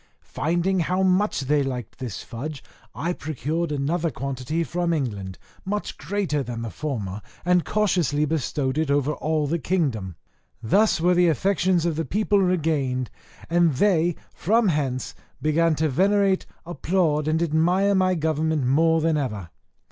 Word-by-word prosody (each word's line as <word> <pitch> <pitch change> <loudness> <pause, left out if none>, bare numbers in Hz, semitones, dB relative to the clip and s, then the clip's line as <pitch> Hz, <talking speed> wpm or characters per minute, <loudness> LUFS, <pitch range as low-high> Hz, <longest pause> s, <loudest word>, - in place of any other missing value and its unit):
Finding 175 +4 0
how 180 +3 +1
much 190 -1 +2
they 145 +2 +2
liked 125 -5 -5
this 125 -6 -5
fudge, 140 +5 -7 0.3
I 175 +2 -1
procured 155 +2 -3
another 155 +4 0
quantity 140 +3 -3
from 175 0 -1
England, 100 - -3 0.3
much 205 +2 -3
greater 190 -8 -2
than 120 -2 -5
the 115 - -5
former, 105 - -4 0.2
and 180 -1 +3
cautiously 170 - +1
bestowed 145 -2 -1
it 160 -2 0
over 145 +1 +2
all 155 0 -1
the 165 +4 -1
kingdom. 130 - -1 0.4
Thus 195 - +3
were 175 +2 +3
the 175 0 +4
affections 180 +2 +2
of 165 -3 0
the 165 - -1
people 210 0 +1
regained; 150 -9 0 0.4
and 170 -3 +3
they, 175 0 +2 0.2
from 220 +2 +2
hence, 135 -5 -1 0.3
began 160 +1 +2
to 155 +1 +1
venerate, 195 +6 +2 0.2
applaud, 160 -2 0
and 155 +1 +2
admire 175 +5 +2
my 185 -1 +2
government 155 -2 0
more 160 +5 +3
than 160 -1 +2
ever. 105 - -4
160 Hz, 150 wpm, -24 LUFS, 140-180 Hz, 0.4 s, the